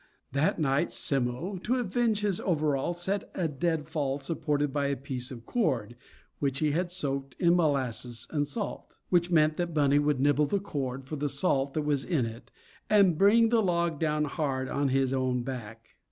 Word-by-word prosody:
That 140 Hz, +3 st, +1 dB
night 140 Hz, -3 st, +1 dB
Simmo, 135 Hz, +8 st, -1 dB
to 220 Hz, +7 st, -1 dB
avenge 230 Hz, -2 st, 0 dB
his 205 Hz, -3 st, 0 dB
overalls, 155 Hz, 0 st, 0 dB
set 195 Hz, +2 st, -1 dB
a 175 Hz, -3 st, 0 dB
deadfall 150 Hz, -2 st, -1 dB
supported 145 Hz, -1 st, -1 dB
by 140 Hz, -1 st, 0 dB
a 140 Hz, -, 0 dB
piece 130 Hz, -2 st, -4 dB
of 120 Hz, -3 st, -9 dB
cord, 130 Hz, -, -1 dB, 0.4 s
which 135 Hz, -2 st, 0 dB
he 155 Hz, 0 st, +1 dB
had 175 Hz, +4 st, 0 dB
soaked 140 Hz, -7 st, -3 dB
in 170 Hz, 0 st, +4 dB
molasses 130 Hz, -7 st, 0 dB
and 145 Hz, -2 st, 0 dB
salt. 210 Hz, +3 st, -5 dB
Which 175 Hz, -1 st, +3 dB
meant 155 Hz, -2 st, +3 dB
that 175 Hz, -2 st, -2 dB
Bunny 145 Hz, -1 st, +4 dB
would 145 Hz, -2 st, +1 dB
nibble 145 Hz, +2 st, +3 dB
the 200 Hz, -, 0 dB
cord 135 Hz, -9 st, -4 dB
for 150 Hz, +4 st, -6 dB
the 145 Hz, +1 st, -1 dB
salt 140 Hz, -2 st, 0 dB
that 155 Hz, -, 0 dB
was 145 Hz, -2 st, 0 dB
in 150 Hz, -8 st, 0 dB
it, 115 Hz, +1 st, -8 dB, 0.4 s
and 200 Hz, -5 st, +5 dB
bring 220 Hz, +6 st, +5 dB
the 230 Hz, -1 st, +3 dB
log 170 Hz, -5 st, 0 dB
down 150 Hz, -1 st, +1 dB
hard 140 Hz, -3 st, -2 dB
on 140 Hz, 0 st, 0 dB
his 135 Hz, 0 st, +1 dB
own 130 Hz, -2 st, 0 dB
back. 115 Hz, -3 st, -7 dB
145 Hz, 180 wpm, -29 LUFS, 135-175 Hz, 0.4 s, and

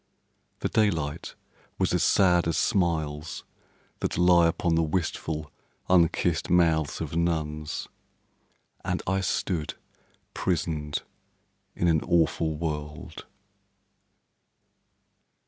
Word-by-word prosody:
The -, -, +1 dB
daylight 80 Hz, -10 st, 0 dB, 0.4 s
was 95 Hz, -2 st, +1 dB
as 90 Hz, -2 st, +2 dB
sad 90 Hz, -3 st, +4 dB
as 85 Hz, -, 0 dB
smiles 80 Hz, -6 st, 0 dB, 0.6 s
that -, -, -2 dB
lie 90 Hz, -1 st, +5 dB
Upon 85 Hz, +1 st, 0 dB
the 80 Hz, -, +3 dB
wistful, 80 Hz, -2 st, -2 dB, 0.4 s
unkissed 85 Hz, -1 st, +2 dB
mouths 80 Hz, -4 st, +2 dB
of 80 Hz, -1 st, -4 dB
nuns, 80 Hz, -2 st, -2 dB, 1.0 s
And 90 Hz, 0 st, -2 dB
I 95 Hz, +1 st, 0 dB
stood 90 Hz, -4 st, -1 dB, 0.6 s
prisoned 80 Hz, -4 st, -2 dB, 0.7 s
in 85 Hz, -, 0 dB
an 80 Hz, -2 st, +3 dB
awful 80 Hz, -2 st, +1 dB
world. 75 Hz, -2 st, -5 dB
85 Hz, 95 wpm, -27 LUFS, 75-90 Hz, 1.0 s, lie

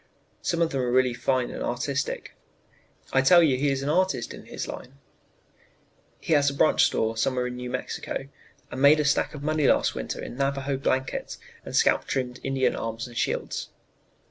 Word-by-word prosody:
Some 170 Hz, -1 st, +1 dB
of 165 Hz, -, -1 dB
them 135 Hz, -, -1 dB
are 125 Hz, -1 st, -1 dB
really 130 Hz, 0 st, +3 dB
fine 125 Hz, +1 st, 0 dB
and -, -, -7 dB
artistic. 135 Hz, +3 st, -2 dB, 0.8 s
I 130 Hz, -, +5 dB
tell 170 Hz, +6 st, +7 dB
you 145 Hz, -5 st, +3 dB
he 140 Hz, +3 st, +1 dB
is 135 Hz, 0 st, -1 dB
an 140 Hz, -, -1 dB
artist 180 Hz, -6 st, +1 dB
in -, -, -11 dB
his -, -, -5 dB
line. 130 Hz, +2 st, -9 dB, 1.2 s
"He 165 Hz, -, -1 dB
has 145 Hz, -1 st, +4 dB
a 140 Hz, -, -6 dB
branch 155 Hz, -, +4 dB
store 110 Hz, 0 st, 0 dB
still 110 Hz, -, -1 dB
somewhere 125 Hz, -1 st, 0 dB
in 125 Hz, 0 st, -4 dB
New 125 Hz, 0 st, -5 dB
Mexico, -, -, -4 dB, 0.4 s
and 130 Hz, -, -5 dB
made 145 Hz, +2 st, +7 dB
a 150 Hz, -, +1 dB
stack 140 Hz, +2 st, +1 dB
of 140 Hz, -, -8 dB
money 155 Hz, -1 st, +1 dB
last -, -, +3 dB
winter -, -, -5 dB
in 120 Hz, -, -7 dB
Navajo 140 Hz, 0 st, -1 dB
blankets 130 Hz, 0 st, -2 dB, 0.3 s
and -, -, -6 dB
scalp -, -, +3 dB
trimmed 125 Hz, -2 st, -3 dB
Indian 135 Hz, -1 st, +1 dB
arms 115 Hz, 0 st, -4 dB
and 120 Hz, -1 st, -11 dB
shields. -, -, -2 dB
135 Hz, 195 wpm, -26 LUFS, 125-145 Hz, 1.2 s, tell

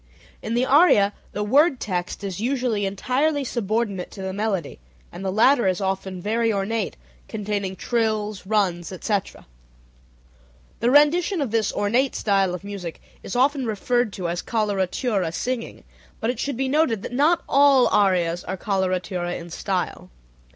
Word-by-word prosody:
In 225 Hz, +2 st, -3 dB
the 245 Hz, +2 st, +2 dB
aria 265 Hz, -, +5 dB, 0.2 s
the 210 Hz, -, -3 dB
word 275 Hz, +5 st, +3 dB
text 180 Hz, 0 st, -3 dB
is 195 Hz, -1 st, -4 dB
usually 240 Hz, -4 st, 0 dB
entirely 275 Hz, +9 st, 0 dB
subordinate 215 Hz, -5 st, -2 dB
to 195 Hz, -, -9 dB
the 190 Hz, 0 st, -3 dB
melody, 195 Hz, -, -2 dB, 0.3 s
and 195 Hz, -, -8 dB
the 190 Hz, -, -1 dB
latter 235 Hz, +3 st, +4 dB
is 185 Hz, -1 st, +1 dB
often 190 Hz, -1 st, -3 dB
very 225 Hz, +4 st, 0 dB
ornate, 205 Hz, +1 st, -2 dB, 0.3 s
containing 200 Hz, -2 st, -3 dB
trills, 215 Hz, -3 st, -1 dB
runs, 190 Hz, -5 st, 0 dB
etc. 195 Hz, +1 st, -3 dB, 1.3 s
The 235 Hz, -, +2 dB
rendition 325 Hz, +7 st, +4 dB
of 275 Hz, -7 st, -1 dB
this 220 Hz, -2 st, +1 dB
ornate 240 Hz, +6 st, +1 dB
style 195 Hz, -3 st, +1 dB
of 180 Hz, -, -9 dB
music 195 Hz, -5 st, -6 dB, 0.2 s
is -, -, -6 dB
often 265 Hz, 0 st, +2 dB
referred 235 Hz, +2 st, 0 dB
to 180 Hz, -3 st, -3 dB
as 175 Hz, +1 st, -2 dB
"coloratura 200 Hz, -3 st, -1 dB
singing," 245 Hz, +6 st, -4 dB, 0.4 s
but 230 Hz, 0 st, 0 dB
it 245 Hz, -, -8 dB
should 280 Hz, -3 st, -2 dB
be 265 Hz, +1 st, 0 dB
noted 260 Hz, -7 st, +1 dB
that -, -, -6 dB
not 315 Hz, +6 st, +3 dB
all 275 Hz, -2 st, +5 dB
arias 180 Hz, -4 st, +2 dB
are 190 Hz, -, -4 dB
coloratura 185 Hz, -2 st, -1 dB
in 170 Hz, 0 st, -10 dB
style. 185 Hz, +1 st, -3 dB
210 Hz, 150 wpm, -23 LUFS, 190-250 Hz, 1.3 s, aria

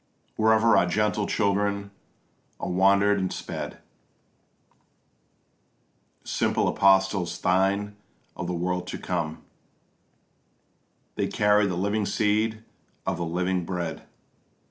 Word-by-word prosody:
Wherever 110 Hz, +1 st, +4 dB
our 90 Hz, -, +4 dB
gentle 105 Hz, +2 st, 0 dB
children 100 Hz, -1 st, 0 dB, 0.7 s
are -, -, -4 dB
wander'd 100 Hz, +2 st, +4 dB
and 95 Hz, -1 st, -2 dB
sped, -, -, -6 dB, 2.5 s
Simple -, -, 0 dB
apostles 95 Hz, -3 st, +2 dB
thine 100 Hz, +2 st, +1 dB, 0.4 s
of 90 Hz, -, -5 dB
the 90 Hz, -, -2 dB
world 90 Hz, +1 st, -2 dB
to -, -, -5 dB
come, 80 Hz, -3 st, -3 dB, 1.7 s
They -, -, 0 dB
carried 105 Hz, -1 st, +3 dB
the 90 Hz, -, -2 dB
living 100 Hz, +2 st, 0 dB
seed 110 Hz, +1 st, 0 dB, 0.4 s
of -, -, -1 dB
the 85 Hz, -, -2 dB
living 90 Hz, +2 st, -1 dB
Bread. 85 Hz, -2 st, -5 dB
100 Hz, 100 wpm, -26 LUFS, 90-105 Hz, 2.5 s, Wherever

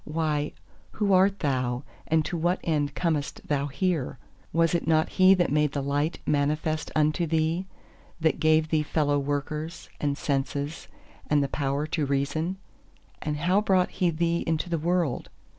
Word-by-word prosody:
Why, 150 Hz, -1 st, -1 dB, 0.4 s
who 205 Hz, -2 st, +1 dB
art 190 Hz, +1 st, +4 dB
thou, 130 Hz, -3 st, 0 dB, 0.2 s
and 160 Hz, -1 st, +2 dB
to 175 Hz, -, -3 dB
what 175 Hz, +2 st, +1 dB
end 145 Hz, -3 st, 0 dB
comest 160 Hz, -5 st, -2 dB
thou 145 Hz, -1 st, 0 dB
here? 145 Hz, -1 st, -1 dB, 0.3 s
was 165 Hz, +1 st, +2 dB
it 170 Hz, -2 st, 0 dB
not 160 Hz, -1 st, +3 dB
He 185 Hz, +1 st, +6 dB
that 175 Hz, -5 st, +1 dB
made 150 Hz, -1 st, +2 dB
the 140 Hz, -, -2 dB
Light 145 Hz, +3 st, 0 dB
manifest 150 Hz, +2 st, 0 dB
unto 155 Hz, +2 st, +2 dB
thee, 160 Hz, +3 st, 0 dB, 0.5 s
that 160 Hz, -1 st, +1 dB
gave 155 Hz, 0 st, +3 dB
thee 155 Hz, -1 st, +2 dB
fellow 145 Hz, -1 st, +1 dB
workers, 145 Hz, +3 st, -3 dB
and 145 Hz, -1 st, -1 dB
senses, 140 Hz, +2 st, -2 dB, 0.4 s
and 145 Hz, -1 st, +3 dB
the -, -, 0 dB
power 140 Hz, +1 st, -1 dB
to 155 Hz, -2 st, -1 dB
reason? 145 Hz, +6 st, -1 dB, 0.6 s
And 150 Hz, -1 st, -2 dB
how 180 Hz, +6 st, +2 dB
brought 190 Hz, -3 st, +2 dB
He 180 Hz, -, +1 dB
thee 170 Hz, +1 st, 0 dB
into 165 Hz, +2 st, -1 dB
the 165 Hz, -, +1 dB
world? 170 Hz, -4 st, 0 dB
155 Hz, 160 wpm, -27 LUFS, 145-170 Hz, 0.6 s, He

